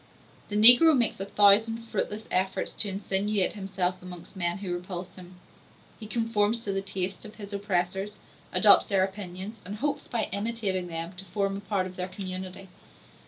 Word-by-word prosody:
The 205 - -4
negro 245 +8 +9
makes 235 -6 +1
a 195 - -3
thousand 210 +3 +4
fruitless 215 -1 -3
efforts 190 +1 -1
to 210 - 0
insinuate 195 0 0
himself 185 -3 -3
amongst 180 +1 -11
men 175 -1 -1
who 190 -3 -4
repulse 180 0 -6
him; 180 0 -13 0.6
he 215 - -8
conforms 225 0 0
to 200 - -3
the 195 - -1
tastes 190 -1 -5
of 215 -1 -11
his 205 -1 -9
oppressors, 195 0 -2 0.3
adopts - - +5
their 195 -2 +3
opinions, 190 +2 -6
and 200 +3 -6
hopes 285 +7 -3
by 235 -3 -1
imitating 200 -4 -2
them 165 +1 -5
to 190 - -7
form 195 +1 -2
a - - -4
part 200 -2 -1
of 185 0 -9
their 180 0 -3
community. 185 0 -7
195 Hz, 170 wpm, -27 LUFS, 185-210 Hz, 0.6 s, negro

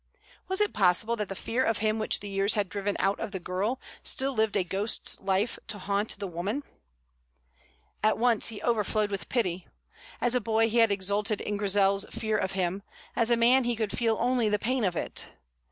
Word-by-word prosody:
Was 380 +2 0
it 420 - +2
possible 205 +4 +2
that 210 -3 -3
the 195 - -4
fear 240 +6 -1
of 225 -3 +1
him 215 +1 0
which 215 - +1
the 205 - -7
years 195 +2 +1
had 205 -3 0
driven 200 0 -2
out 195 +1 +1
of - - -4
the 190 - -4
girl 195 +8 -2 0.2
still 270 +1 +2
lived 220 -3 +1
a 190 - +2
ghost's 195 +5 0
life 195 +4 0
to 210 - -4
haunt 200 +2 -1
the 200 - -4
woman? 195 - -3 1.4
At 215 - +3
once 235 -1 +2
he 220 -3 -6
overflowed 215 -2 +1
with 195 -4 -4
pity. 185 -8 -1 0.5
As 245 0 +1
a 250 - +2
boy 225 +1 +2
he 235 - +2
had 225 -1 +6
exulted 200 +2 0
in 205 - -3
Grizel's 200 0 +2
fear 220 -2 -1
of 190 0 -2
him; 190 0 -1 0.3
as 230 -1 +2
a 235 - +4
man 250 +3 +5
he 240 0 0
could 220 -2 -2
feel 225 -2 +1
only 245 -2 +2
the 210 - +2
pain 250 +3 -1
of 180 -3 0
it. - - -3
210 Hz, 205 wpm, -28 LUFS, 195-230 Hz, 1.4 s, had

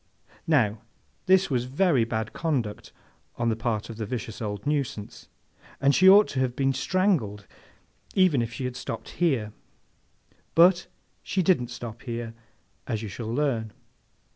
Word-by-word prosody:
Now, 115 -9 +2 0.5
this 190 -2 +4
was 125 -2 0
very 140 -2 +2
bad 110 -1 -3
conduct 130 -11 -2 0.4
on 120 0 0
the 110 - +1
part 115 -2 -2
of 115 - -9
the 110 - -3
vicious 115 -2 -5
old 105 -2 -4
nuisance, 140 -8 -3 0.5
and 140 +1 +3
she 185 +5 +7
ought 205 +2 +8
to 130 - -3
have 130 -2 0
been 135 0 +1
strangled, 130 - 0 0.7
even 185 -9 +4
if 115 0 -3
she 130 - -5
had 125 -1 -4
stopped 125 - -6
here; 125 -11 +1 1.0
but, 175 +2 +5 0.3
she 190 - -1
didn't 160 -9 +2
stop 120 -1 -8
here, 115 -2 -5 0.5
as 115 -4 -2
you 110 - -5
shall 110 +2 -5
learn. 120 -5 -1
125 Hz, 150 wpm, -26 LUFS, 110-150 Hz, 1.0 s, ought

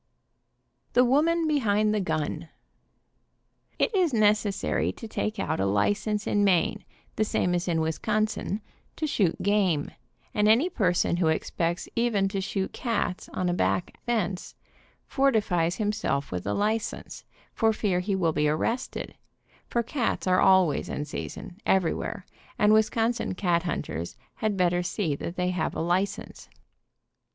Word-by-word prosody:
THE 250 +1 +5
WOMAN 320 +6 +3
BEHIND 215 -8 +2
THE 215 - +1
GUN. 160 -2 -2 1.3
It 465 - +1
is 355 - +2
necessary 210 -2 +2
to 225 - -9
take 215 0 -3
out - - -1
a 95 - +1
license 205 - 0
in 205 - +2
Maine, 185 -4 +2 0.3
the 215 - +3
same 180 -4 0
as 175 +1 -1
in 165 -2 +1
Wisconsin, 210 +5 -1 0.3
to 315 - -2
shoot 200 - +1
game, 190 -7 +1 0.4
and 210 0 +2
any 240 +11 +4
per 190 - +2
son 175 -1 +1
who 175 -2 +2
expects 165 +2 -1
even 230 -4 +2
to 195 0 -2
shoot 190 0 -3
cats 215 -6 -2
on 185 - -2
a 175 - +1
back 175 0 0
fence, 200 -6 -1 0.5
fortifies 205 -11 +1
himself 205 -10 -1
with 90 +1 -4
a 100 - 0
license, 215 +2 -2 0.3
for 225 -1 +3
fear 200 -4 0
he 195 +2 -1
will 170 -4 +1
be 150 0 +2
ar 155 - +1
rested, 235 +9 -3 0.5
for 235 - 0
cats 240 +1 -1
are 185 0 +3
always 185 -6 +4
in 145 - -3
season, 180 +5 -7
everywhere, 185 0 0 0.3
and 210 0 +4
Wisconsin 225 -1 +1
cat 175 -3 +1
hunters 85 - -4 0.2
had 215 -2 -1
better 175 -1 +2
see 175 -2 -1
that 170 +4 -6
they 180 0 0
have 175 -3 -2
a - - -3
license. 180 +4 -2
195 Hz, 150 wpm, -27 LUFS, 175-220 Hz, 1.3 s, THE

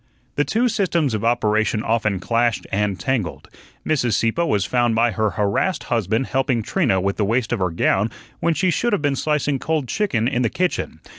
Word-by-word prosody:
The 145 - +2
two 235 +10 +1
systems 175 - 0
of 110 -1 -2
operation 110 -2 +1
often 110 -4 0
clashed 115 +3 0
and 100 -1 0
tangled. 120 -10 -2 0.4
Mrs. 125 -7 +1
Sieppe 115 +10 +1
was 105 - +1
found 120 +4 +1
by 115 +1 +3
her 110 -1 0
harassed 105 - 0
husband 115 +3 0
helping 130 -4 0
Trina 125 - +1
with 100 +1 -1
the 105 - +1
waist 115 +3 0
of 120 - -1
her 90 -1 +1
gown 95 +5 +1 0.3
when 170 -1 +1
she 180 +4 +2
should 235 +7 0
have 195 - 0
been 145 -1 +1
slicing 145 -2 0
cold 155 -3 -1
chicken 120 - 0
in 125 -2 0
the 120 - +2
kitchen. 180 -1 -2
120 Hz, 195 wpm, -21 LUFS, 105-150 Hz, 0.4 s, by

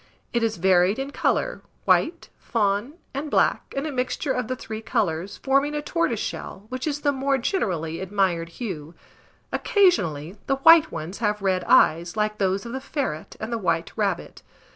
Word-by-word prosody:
It 235 - +2
is 225 -1 0
varied 185 +3 +4
in 270 +1 -4
colour, - - 0 0.2
white, 335 +1 +2
fawn, 210 +3 0 0.2
and 285 +3 -3
black, - - +1
and 275 - -1
a 310 - -2
mixture 260 +2 -1
of 250 -3 -1
the 255 - -2
three 220 -3 -7
colours, 185 -4 -1
forming 275 +2 +1
a 295 - -1
tortoiseshell, 235 - -2
which 255 +3 -4
is 295 -1 -2
the 285 - +3
more 275 0 +1
generally 175 - -1
admired 185 -3 0
hue. 170 - -6 0.6
Occasionally, 190 - +2
the 270 - +2
white 325 +3 +7
ones 170 +6 -6
have 210 -2 0
red 185 -2 +1
eyes, 170 +5 +4
like 210 0 0
those 195 +1 0
of 235 - -6
the 265 - -4
ferret 270 - -4
and 220 +2 -4
the 230 - -1
white 165 -4 -1
rabbit. 195 -5 -2
220 Hz, 170 wpm, -24 LUFS, 185-275 Hz, 0.6 s, white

